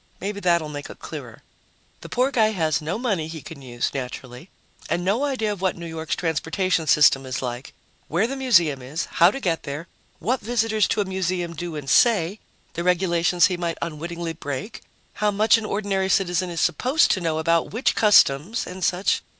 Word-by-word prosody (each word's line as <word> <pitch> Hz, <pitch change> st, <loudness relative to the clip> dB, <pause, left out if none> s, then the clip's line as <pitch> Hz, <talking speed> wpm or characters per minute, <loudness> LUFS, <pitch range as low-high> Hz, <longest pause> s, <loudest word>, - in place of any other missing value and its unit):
Maybe 200 Hz, +1 st, -4 dB
that'll 170 Hz, -4 st, +2 dB
make 145 Hz, -1 st, -7 dB
it -, -, -10 dB
clearer. -, -, -9 dB, 0.6 s
The -, -, -11 dB
poor 255 Hz, +2 st, +1 dB
guy 220 Hz, -4 st, +2 dB
has 155 Hz, -6 st, 0 dB
no 160 Hz, +6 st, -3 dB
money 205 Hz, -10 st, -1 dB
he 160 Hz, 0 st, -7 dB
can 155 Hz, -4 st, -10 dB
use, 120 Hz, -2 st, -3 dB
naturally, 125 Hz, +3 st, -7 dB, 0.4 s
and 175 Hz, +1 st, -1 dB
no 220 Hz, +9 st, +1 dB
idea 255 Hz, -7 st, -1 dB
of 195 Hz, -, -10 dB
what 190 Hz, -2 st, 0 dB
New 170 Hz, -, -7 dB
York's 160 Hz, -1 st, -3 dB
transportation 165 Hz, +1 st, -1 dB
system 140 Hz, -2 st, +5 dB
is 130 Hz, 0 st, -4 dB
like, 125 Hz, +1 st, -5 dB, 0.4 s
where 175 Hz, +7 st, +1 dB
the 265 Hz, +4 st, -3 dB
museum 170 Hz, -, +3 dB
is, 140 Hz, +6 st, -4 dB
how 170 Hz, -, +4 dB
to 270 Hz, -, -5 dB
get 170 Hz, -9 st, -1 dB
there, 145 Hz, +4 st, -6 dB, 0.3 s
what 250 Hz, +4 st, -1 dB
visitors 220 Hz, -2 st, +1 dB
to 210 Hz, -, 0 dB
a -, -, -1 dB
museum 185 Hz, -2 st, -2 dB
do 175 Hz, 0 st, -5 dB
and 145 Hz, -2 st, -6 dB
say, 200 Hz, -, +3 dB, 0.3 s
the 170 Hz, -, -3 dB
regulations 175 Hz, -1 st, +3 dB
he 180 Hz, -3 st, 0 dB
might 170 Hz, -1 st, -3 dB
unwittingly 170 Hz, +1 st, -4 dB
break, 155 Hz, -, -6 dB, 0.4 s
how 210 Hz, -, +3 dB
much 215 Hz, +3 st, +4 dB
an 220 Hz, -, -6 dB
ordinary 195 Hz, -2 st, -1 dB
citizen 185 Hz, -2 st, +1 dB
is 170 Hz, -1 st, -4 dB
supposed 255 Hz, -, +2 dB
to 190 Hz, -, 0 dB
know 165 Hz, -2 st, -1 dB
about 165 Hz, +1 st, +1 dB
which 230 Hz, +5 st, 0 dB
customs 205 Hz, -, +4 dB
and 185 Hz, +1 st, -7 dB
such. 180 Hz, +3 st, +1 dB
175 Hz, 190 wpm, -23 LUFS, 160-205 Hz, 0.6 s, system